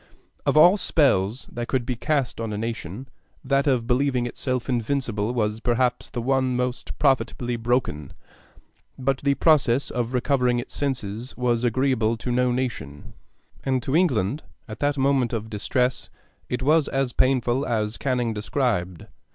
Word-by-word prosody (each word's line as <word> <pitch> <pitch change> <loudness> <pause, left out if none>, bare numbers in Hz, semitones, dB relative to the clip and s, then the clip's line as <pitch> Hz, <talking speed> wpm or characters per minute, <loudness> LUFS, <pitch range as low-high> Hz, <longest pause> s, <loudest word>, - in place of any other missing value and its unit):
Of - - +3
all 175 +6 +7
spells 125 - +1
that 120 0 -4
could 130 -2 -1
be 125 0 -2
cast 135 -2 -1
on 115 -1 -3
a 105 - -3
nation, 115 +1 -5 0.4
that 140 +2 +1
of 125 -4 +2
believing 125 0 +1
itself 125 0 -3
invincible 120 -3 -1
was 110 -3 -1
perhaps 125 +1 0
the 120 - -4
one 130 0 +1
most 125 0 -3
profitably 130 -3 +1
broken; 115 - -1 0.9
but 135 0 0
the 140 0 +1
process 140 -5 +3
of 120 +1 -2
recovering 125 -1 +2
its 120 - -5
senses 125 -4 -3
was 120 -1 +1
agreeable 120 -2 +1
to 125 - -4
no 125 0 +2
nation, 120 - -4 0.5
and 130 -2 0
to 135 - -1
England, 140 - +1 0.3
at 110 -1 -8
that 145 0 0
moment 135 -3 +2
of 110 -1 -4
distress, 125 +4 -1 0.4
it 125 +1 -2
was 155 +1 +3
as 135 -2 -1
painful 130 0 +2
as 110 -3 -1
Canning 125 -4 -1
described. 105 - -1
125 Hz, 150 wpm, -24 LUFS, 115-135 Hz, 0.9 s, all